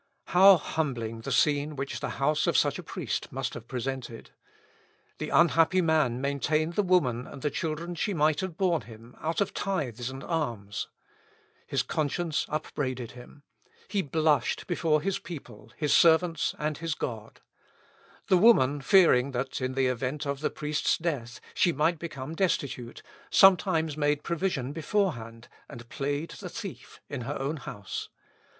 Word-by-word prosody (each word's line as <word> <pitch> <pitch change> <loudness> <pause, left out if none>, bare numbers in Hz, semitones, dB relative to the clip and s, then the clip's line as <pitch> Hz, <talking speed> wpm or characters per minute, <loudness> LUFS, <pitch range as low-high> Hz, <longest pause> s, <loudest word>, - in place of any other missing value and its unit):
How 190 +2 +8
humbling 125 -8 -3
the 135 - -5
scene 145 +3 +2
which 135 0 -4
the - - -3
house 150 +2 +1
of - - +3
such - - +2
a - - -4
priest - - -4
must - - -3
have 115 - -9
presented! 125 -2 -5 0.9
The - - -3
unhappy 170 +2 +4
man 155 -7 +2
maintained 145 +4 0
the 205 - +2
woman 150 - +1
and 140 - -10
the 150 - 0
children 165 +2 -3
she 195 +3 -2
might 155 -1 +2
have 185 -3 -4
borne 180 -5 +2
him, 115 +2 -14
out 160 +3 -1
of 200 - 0
tithes 130 - -2
and 135 +1 -8
alms. 120 - -3 0.8
His - - 0
conscience 155 +1 -1
upbraided 130 -5 -3
him. 125 +3 -14 0.5
He 200 - +1
blushed 155 -3 +1
before 160 -4 +1
his 195 +1 -1
people, 165 -6 -10
his 150 -2 +1
servants, 165 0 +4
and 150 -1 -2
his 165 -2 -2
God. 115 -7 -6 0.9
The 185 - +4
woman 145 - +5
fearing, 140 -5 +5
that, 130 +2 -3
in 130 0 -1
the 135 -1 +2
event 130 +4 -2
of 140 -1 -2
the 155 - 0
priest's 150 0 0
death, 135 -9 -3
she 175 - +3
might 160 +2 +1
become 155 -3 -6
destitute, 140 -9 -2 0.3
sometimes 180 -5 +4
made 150 -1 0
provision 170 -7 -1
beforehand, 130 - -2 0.2
and 120 0 -10
played 145 +3 -3
the 185 - -6
thief 185 - -8
in 140 -3 -5
her 135 +5 -4
own 140 +4 -2
house. 100 -7 -6
150 Hz, 155 wpm, -28 LUFS, 130-165 Hz, 0.9 s, How